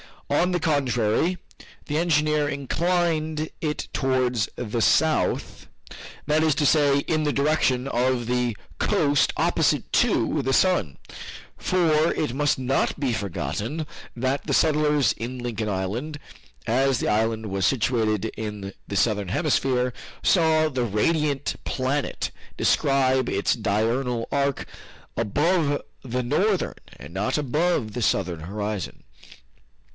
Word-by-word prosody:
On 175 Hz, +5 st, +2 dB
the 175 Hz, -2 st, 0 dB
contrary, 140 Hz, +2 st, +1 dB, 0.5 s
the 150 Hz, -1 st, -2 dB
engineer 150 Hz, -3 st, +2 dB
inclined 155 Hz, +2 st, -1 dB
it 150 Hz, -2 st, -3 dB
towards 130 Hz, -4 st, +1 dB
the 115 Hz, 0 st, -3 dB
south, 160 Hz, +6 st, +1 dB, 0.6 s
that 150 Hz, +1 st, +2 dB
is 155 Hz, -3 st, +3 dB
to 145 Hz, -, +1 dB
say, 145 Hz, -1 st, +4 dB
in 155 Hz, +2 st, -1 dB
the 145 Hz, -1 st, 0 dB
direction 140 Hz, -3 st, +1 dB
of 125 Hz, -1 st, 0 dB
the 120 Hz, -2 st, 0 dB, 0.2 s
coast 145 Hz, 0 st, +2 dB
opposite -, -, +1 dB
to 150 Hz, -, +2 dB
the 135 Hz, 0 st, -1 dB
sun, 130 Hz, -, +2 dB, 0.6 s
for 165 Hz, -3 st, +2 dB
it 150 Hz, -6 st, -1 dB
must 145 Hz, +1 st, +1 dB
not 130 Hz, +2 st, 0 dB
be 135 Hz, -4 st, 0 dB
forgotten 110 Hz, -, -3 dB, 0.3 s
that 130 Hz, +3 st, -2 dB
the -, -, 0 dB
settlers 150 Hz, -4 st, +3 dB
in 125 Hz, +3 st, -6 dB
Lincoln 115 Hz, -3 st, -3 dB
Island, 105 Hz, +11 st, -3 dB, 0.5 s
as 130 Hz, +3 st, +2 dB
the -, -, 0 dB
island 110 Hz, +1 st, 0 dB
was 95 Hz, -1 st, -1 dB
situated 110 Hz, -4 st, +1 dB
in 105 Hz, -3 st, -5 dB
the 100 Hz, -, -5 dB
Southern 105 Hz, 0 st, +1 dB
Hemisphere, 125 Hz, -, +1 dB, 0.3 s
saw 160 Hz, -3 st, +3 dB
the 130 Hz, -4 st, -1 dB
radiant 145 Hz, +6 st, 0 dB
planet 135 Hz, +2 st, -2 dB, 0.3 s
describe 130 Hz, -2 st, +2 dB
its 100 Hz, -, +1 dB
diurnal 115 Hz, +3 st, 0 dB
arc 140 Hz, -1 st, 0 dB, 0.5 s
above 145 Hz, -, +1 dB, 0.2 s
the 125 Hz, 0 st, -2 dB
northern, 185 Hz, -, +1 dB, 0.2 s
and 75 Hz, +5 st, -11 dB
not 105 Hz, +9 st, -1 dB
above 150 Hz, -4 st, 0 dB
the 120 Hz, -, -4 dB
southern 90 Hz, -6 st, 0 dB
horizon. 100 Hz, +2 st, -5 dB
130 Hz, 125 wpm, -24 LUFS, 115-150 Hz, 0.6 s, say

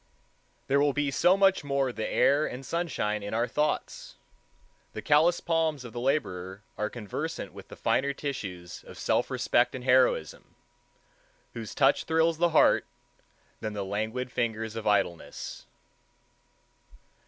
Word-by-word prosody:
There 140 Hz, +1 st, +2 dB
will 145 Hz, 0 st, +3 dB
be 145 Hz, -1 st, 0 dB
so 180 Hz, +7 st, +4 dB
much 195 Hz, -1 st, +4 dB
the 145 Hz, -, -13 dB
more 135 Hz, -2 st, 0 dB
air 140 Hz, +6 st, +2 dB
and 130 Hz, +2 st, -7 dB
sunshine 135 Hz, -12 st, -1 dB
in 100 Hz, +2 st, -4 dB
our 120 Hz, +2 st, +1 dB
thoughts. 150 Hz, +5 st, -2 dB, 0.8 s
The -, -, -5 dB
callous 160 Hz, +4 st, +4 dB
palms 160 Hz, -5 st, 0 dB
of 115 Hz, -, -9 dB
the 120 Hz, -, -4 dB
laborer 100 Hz, -8 st, -2 dB
are 105 Hz, 0 st, -2 dB
conversant 110 Hz, -5 st, -5 dB
with -, -, -11 dB
finer 140 Hz, +2 st, 0 dB
tissues 95 Hz, -12 st, -6 dB
of -, -, -11 dB
self -, -, 0 dB
respect 120 Hz, +1 st, +1 dB
and 130 Hz, -, -6 dB
heroism, 125 Hz, -, +2 dB, 1.0 s
whose 115 Hz, -3 st, -7 dB
touch -, -, +3 dB
thrills 160 Hz, 0 st, +2 dB
the 175 Hz, 0 st, +4 dB
heart, 160 Hz, -, +4 dB, 0.7 s
than 110 Hz, -1 st, -4 dB
the 100 Hz, -1 st, -3 dB
languid 110 Hz, +6 st, -3 dB
fingers 110 Hz, -2 st, -2 dB
of 110 Hz, -1 st, -4 dB
idleness. 95 Hz, -5 st, -1 dB
125 Hz, 140 wpm, -28 LUFS, 110-150 Hz, 1.0 s, so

